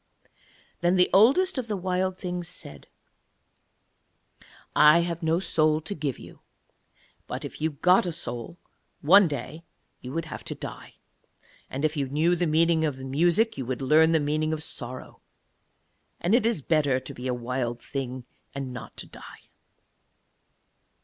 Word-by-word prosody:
Then 175 +1 +2
the 180 -1 +3
Oldest 270 - +4
of 245 - -4
the 210 -2 -2
Wild 185 0 -1
Things 180 -2 -4
said: 75 - -10 1.9
'I 150 +3 +7
have 170 0 -3
no 165 +1 +1
soul 155 -4 +2
to 200 - -5
give 145 -7 -3
you; - - -13 0.9
but - - -5
if - - -9
you 160 - +1
got 180 +6 +3
a - - -1
soul, 125 -2 -4 0.4
one 185 +6 +7
day 150 +2 -6 0.4
you 125 - -8
would 165 +3 -3
have 155 - -8
to - - -5
die, - - -9 0.7
and 140 +4 -2
if 155 +1 0
you 140 -3 -2
knew 160 +5 +2
the 175 0 0
meaning 160 +1 +3
of 150 -4 -1
music 170 - +2
you 130 - -3
would 130 +1 -3
learn 160 +4 +5
the 160 - +3
meaning 155 +2 0
of 155 -1 -3
sorrow, 130 -5 -6 1.0
and 175 +5 0
it 235 -1 +4
is 220 - -1
better 145 -5 +2
to - - -9
be 125 +1 -6
a 125 - 0
Wild 120 0 -3
Thing 130 -2 -5 0.3
and 135 -2 -5
not 125 - -9
to - - -7
die.' - - -13
155 Hz, 160 wpm, -26 LUFS, 135-175 Hz, 1.9 s, I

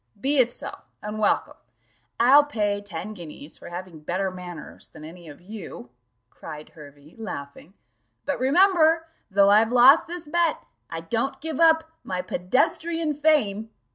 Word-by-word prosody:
"Be 275 +5 +3
it 245 -1 +4
so, - - -7 0.3
and 210 +1 -5
welcome; 210 - +1 0.6
I'll 270 +5 +7
pay 205 -7 -1
ten 205 +1 -7
guineas 160 -5 -11
for - - -10
having 175 -2 -8
better 185 +5 -2
manners 180 -3 -9
than 155 - -13
any 170 0 -12
of 145 - -12
you," 180 - -9 0.4
cried 155 -1 -10
Hervey, 145 0 -15
laughing; 155 -3 -8 0.5
"but 285 - -2
remember, 325 +3 +4 0.2
though 200 0 +4
I've 220 +2 +4
lost 255 +7 +6
this 345 -1 -7
bet, 335 +1 0 0.3
I 165 - -5
don't 235 +10 -2
give 315 -2 -5
up 320 -1 +5 0.2
my 180 -1 -4
pedestrian 310 - 0
fame. 275 -9 +1
215 Hz, 145 wpm, -24 LUFS, 175-295 Hz, 0.6 s, I'll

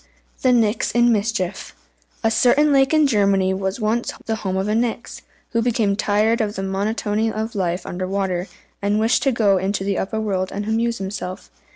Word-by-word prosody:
THE 255 - +3
NIX 225 -2 +2
IN 240 0 +4
MISCHIEF. 210 -3 -2 0.5
A 225 - +3
certain 285 +6 +4
lake 270 -1 +4
in 310 -1 +4
Germany 200 -6 +2
was 190 +3 -3
once 225 +2 0
the 220 -1 -1
home 190 -3 -3
of 190 +1 -1
a 210 - 0
Nix, 230 +1 -2 0.3
who 230 - +1
became 225 -4 +1
tired 215 +3 +1
of 210 -1 -2
the 195 - -3
monotony 210 +3 -1
of 220 +1 -4
life 180 -3 -2
under 185 +1 -4
water, 190 -1 -2 0.3
and 205 +1 +1
wished 225 +3 +2
to 270 +2 +2
go 210 -5 +3
into 195 +1 -1
the 195 -1 -1
upper 220 +3 -2
world 190 -3 -2
and 205 +1 -4
amuse 230 +2 0
himself. 190 -1 -6
210 Hz, 190 wpm, -21 LUFS, 195-230 Hz, 0.5 s, IN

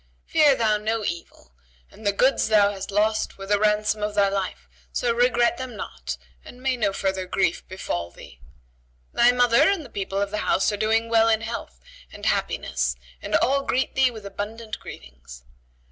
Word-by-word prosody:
Fear 300 -4 +4
thou 215 -3 +2
no 215 +1 -2
evil, 170 - -6 0.4
and 215 -1 -7
the - - +4
goods 255 +7 +2
thou 210 -2 +4
hast 195 -1 -7
lost 215 +2 0
were 195 - -7
the 205 +1 +2
ransom 210 0 +1
of 210 0 -2
thy 200 -1 +4
life; 195 -2 -3 0.2
so 240 -1 0
regret 240 0 +3
them 260 -3 -6
not - - -6 0.3
and 245 - -13
may 260 0 0
no 215 -5 +1
further 190 -1 -2
grief 195 - 0
befall 85 - -4
thee. 60 - -15 0.7
Thy 240 +1 +5
mother 245 +5 +4
and 385 -7 -1
the - - -13
people 195 0 -3
of 200 0 -1
the 210 - -2
house 195 - +2
are - - -1
doing 225 +2 +1
well 225 0 +4
in 220 0 +2
health 225 - -6 0.3
and - - -9
happiness 65 -1 0 0.3
and - - -2
all 275 +3 +3
greet 265 -1 -1
thee 265 -1 +4
with 220 -4 -10
abundant 215 +2 -6
greetings. - - -12
215 Hz, 185 wpm, -24 LUFS, 195-235 Hz, 0.7 s, Thy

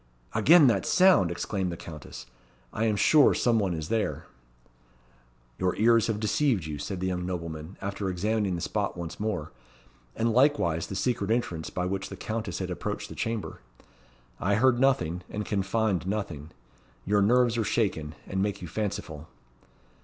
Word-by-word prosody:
"Again 165 -1 +6
that 110 -7 +2
sound!" 185 - +5
exclaimed 90 +1 -2
the 85 - -6
Countess. 75 -7 -9 0.5
"I 110 - 0
am 110 -2 +2
sure 145 +8 +5
some 115 -2 +2
one 95 -4 0
is 80 -1 -5
there." 110 -2 -1 1.3
"Your 95 -1 +1
ears 115 0 +4
have 110 -2 -1
deceived 110 - +1
you," 75 -2 -5
said 95 +5 -4
the - - -1
young 90 -1 -2
nobleman, 85 -1 -5
after 100 0 -3
examining 100 +1 0
the 85 - -4
spot - - -2
once 85 -2 -6
more, 105 -8 -3 0.6
and 115 0 +1
likewise 120 - +2
the 95 - -6
secret 110 0 -1
entrance 100 -9 -1
by 90 - -3
which 95 +1 -3
the 95 - -8
Countess 110 -5 -4
had - - -4
approached - - -4
the - - -9
chamber. 115 - -4 0.8
"I 100 +2 +1
heard 120 +2 +3
nothing, 90 -11 +2
and 105 0 -4
can 100 -2 0
find 95 -2 0
nothing. 95 -8 -4 0.6
Your 105 +1 +2
nerves 120 +3 +3
are 115 - +1
shaken, 100 -9 -1
and 95 0 -2
make 100 0 -1
you 90 - -7
fanciful." 95 -5 -4
100 Hz, 170 wpm, -27 LUFS, 90-115 Hz, 1.3 s, Again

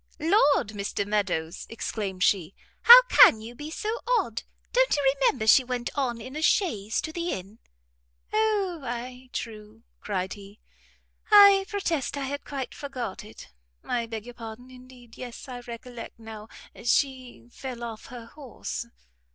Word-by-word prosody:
"Lord, 310 - +3
Mr 200 -1 -3
Meadows," 190 -5 -2
exclaimed 200 -4 -4
she, 185 -2 +1 0.3
"how - - +11
can 225 - +7
you 225 +2 -9
be 295 +5 -8
so 435 +8 -3 0.2
odd? 235 - -2 0.3
Don't - - +3
you 275 -2 +2
remember 260 -4 +2
she 255 +4 +7
went 250 -1 -3
on 250 -5 -1
in 255 +5 -9
a 310 - -4
chaise 220 - +1
to 315 - -5
the 345 +1 -3
inn?" 195 - -6 0.7
"O, 420 -5 +1
ay, 250 +1 -6
true," 215 0 -7 0.2
cried 190 -2 -3
he; 200 0 -13 0.7
"I 400 -2 +8
protest 335 -9 -2
I 280 - -3
had 285 +1 -5
quite 270 -3 -5
forgot 255 -9 -6
it; 210 - -13 0.3
I 235 -2 -2
beg 225 -1 -6
your 245 - -9
pardon, 235 +2 -10
indeed. 250 -2 -15
Yes, 245 +2 -8
I 250 -2 -7
recollect 240 0 -9
now, 220 -1 -10 0.4
she 255 0 -1
fell 250 -2 -7
off 225 -2 -7
her 245 -2 -9
horse." 250 -2 -7
245 Hz, 150 wpm, -26 LUFS, 220-285 Hz, 0.7 s, how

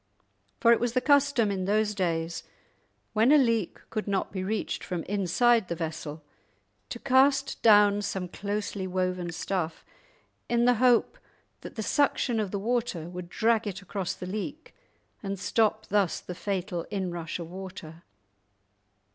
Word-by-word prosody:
For 235 - +5
it 235 - +5
was 240 -1 -1
the 255 - +3
custom 280 -6 +3
in 190 -2 -2
those 210 +1 +1
days, 165 -4 -1 0.7
when 225 +4 +4
a 300 - +8
leak 230 - 0
could 215 -2 -3
not 195 -1 -1
be 185 -2 -3
reached 210 +3 -2
from 175 -3 -3
inside 205 +3 +2
the 170 - -3
vessel, 160 -2 -5 0.7
to - - -5
cast 275 +2 +3
down 205 -2 +6
some 190 -2 -3
closely 200 0 -4
woven 185 -1 -1
stuff 165 -1 -3 0.6
in 235 0 +2
the 245 - +6
hope 255 - +3 0.4
that - - -10
the 220 - -3
suction 250 -3 +1
of 210 -3 -1
the 200 - -3
water 220 -6 -2
would 180 -1 -7
drag 225 +2 +1
it 200 0 -5
across 190 -1 -3
the - - -7
leak 215 - -6 0.5
and 195 -2 -4
stop 215 +1 +1
thus 200 -4 +1
the 180 - -7
fatal 180 -1 -3
inrush 175 -5 -3
of 170 -1 -8
water. 180 -4 -9
200 Hz, 155 wpm, -28 LUFS, 180-230 Hz, 0.7 s, a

